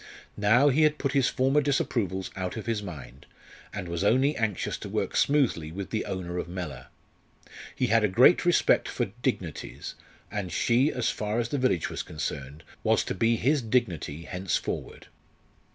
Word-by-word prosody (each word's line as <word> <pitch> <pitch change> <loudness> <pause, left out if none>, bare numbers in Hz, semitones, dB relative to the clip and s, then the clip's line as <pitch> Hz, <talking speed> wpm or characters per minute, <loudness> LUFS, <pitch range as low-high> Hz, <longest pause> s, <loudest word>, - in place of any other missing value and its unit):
Now 120 +8 +5
he 140 +4 +2
had 155 0 +4
put 140 - -1
his 135 -2 +3
former 135 +3 +2
disapprovals 110 -9 -1
out 95 +2 -4
of 110 - -5
his 115 -2 -1
mind, 70 -9 -9 0.4
and 100 -3 -5
was 85 +2 -2
only 130 +8 +3
anxious 110 -4 -1
to - - -7
work - - -2
smoothly 125 - +2
with 95 +3 -6
the 110 - -1
owner 90 -1 -4
of 85 - -5
Mellor. 85 -6 -6 0.9
He 130 - +1
had 115 -2 +3
a - - +5
great 120 - +5
respect 175 -1 +3
for - - -2
"dignities," - - -3 0.4
and 100 -4 -3
she, 125 +5 +2
as 125 - 0
far 105 +1 -2
as 115 -1 -1
the 145 - -1
village 125 -10 +1
was - - -3
concerned, 75 -1 -5 0.2
was - - +3
to - - -3
be 115 0 +2
his 140 +5 +2
"dignity" 100 - -1
henceforward. 90 0 -3
110 Hz, 170 wpm, -27 LUFS, 90-130 Hz, 0.9 s, Now